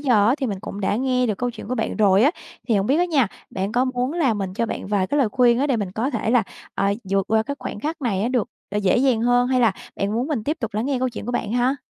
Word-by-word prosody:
giờ 240 -8 +3
á, 245 - +4
thì 270 - -1
mình 200 -5 -4
cũng 200 - -7
đã 200 +1 0
nghe 250 0 +1
được 215 -4 -2
câu 245 0 -1
chuyện 235 -2 -10
của 255 - -1
bạn 225 - -2
rồi 200 -2 +4
á. 285 - +5 0.4
Thì 225 - +3
hông 195 +1 +1
biết 275 - +3
á 350 - +4
nha, 300 -9 +2 0.2
bạn 195 +2 -3
có 250 +1 +2
muốn 255 +2 -1
là 290 -10 +2
mình 195 -3 -4
cho 230 - 0
bạn - - -5
vài 200 -2 +1
cái 290 - 0
lời 255 - +3
khuyên 240 +2 +3
á 280 - +2
để 270 -4 +1
mình 200 -4 -3
có 240 +7 -1
thể 225 -3 -1
là, 245 -2 +4 0.3
ờ, 200 0 +1 0.2
vượt 195 -1 +1
qua 220 0 +4
cái 280 - -4
khoảnh 205 - -6
khắc 310 0 -4
này 215 -3 0
được, 245 -4 0 0.2
ờ, 205 - -3
dễ 200 -3 +2
dàng 250 -3 +3
hơn, 245 +1 +3
hay 255 -1 +2
là 230 -4 +4 0.2
bạn 200 +1 -1
muốn 240 +4 0
mình 280 -9 -2
tiếp 300 +3 -1
tục 225 -4 -4
lắng 220 +5 -1
nghe 275 -2 0
câu 255 0 +1
chuyện 235 -3 -7
của 245 - -2
bạn 220 -3 -2
ha? 245 +3 +2
240 Hz, 310 wpm, -22 LUFS, 210-260 Hz, 0.4 s, á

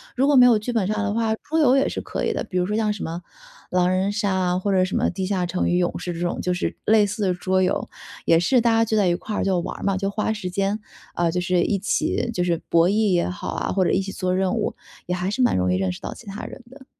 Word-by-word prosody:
如 260 - +2
果 285 0 +4
没 250 -1 +8
有 230 -3 +5
剧 240 +3 -4
本 205 -5 +1
杀 215 - -1
的 205 -1 -1
话， 225 0 0
桌 320 +7 -2
游 265 -4 +5
也 270 - +2
是 - - -3
可 - - -4
以 - - 0
的。 - - -2
比 185 - -4
如 180 - +2
说 210 +3 -2
像 215 -1 +1
什 210 - -5
么 170 +2 -4 0.5
狼 180 0 +2
人 190 +2 +1
杀 205 -1 -1
啊， 180 -1 +1
或 200 +1 -1
者 185 -1 +3
什 185 - -2
么 - - +1
地 185 +1 -3
下 185 -2 0
城 180 +1 -1
与 175 - +2
勇 175 -1 0
士 175 - -4
这 170 - -6
种 175 0 -2
就 180 0 -1
是 175 - -2
类 215 -1 +5
似 210 +2 -4
的 185 -2 +2
桌 185 +1 0
游。 185 - 0 0.4
也 165 - +5
是 240 +8 +3
大 235 -1 +3
家 225 0 +4
聚 220 -1 -1
在 200 -3 +3
一 175 - +3
块 205 +4 -4
儿 - - 0
就 190 -2 +1
玩 170 - -5
儿 - - -9
嘛， 195 -1 +1
就 195 +1 -1
花 215 +1 -1
时 195 -4 -5
间， 195 +3 -1 0.3
呃， 170 -1 +1
就 180 - -1
是 180 0 +1
一 200 - +1
起 210 +3 -1
就 180 - 0
是 170 -2 0
博 170 +1 +4
弈 210 0 +2
也 175 -1 +1
好 180 - -6
啊， - - -2
或 185 -1 +1
者 - - +2
一 190 - +2
起 195 0 -5
做 185 -1 -1
任 190 +2 +1
务， 220 - -1 0.3
也 180 - -2
还 180 +1 -2
是 250 +5 0
蛮 - - +3
容 90 0 +1
易 - - +2
认 95 -1 0
识 90 - -9
到 - - -6
其 - - -14
他 200 +1 -7
人 260 - -10
的。 265 -1 -14
190 Hz, 330 characters per minute, -23 LUFS, 180-215 Hz, 0.5 s, 没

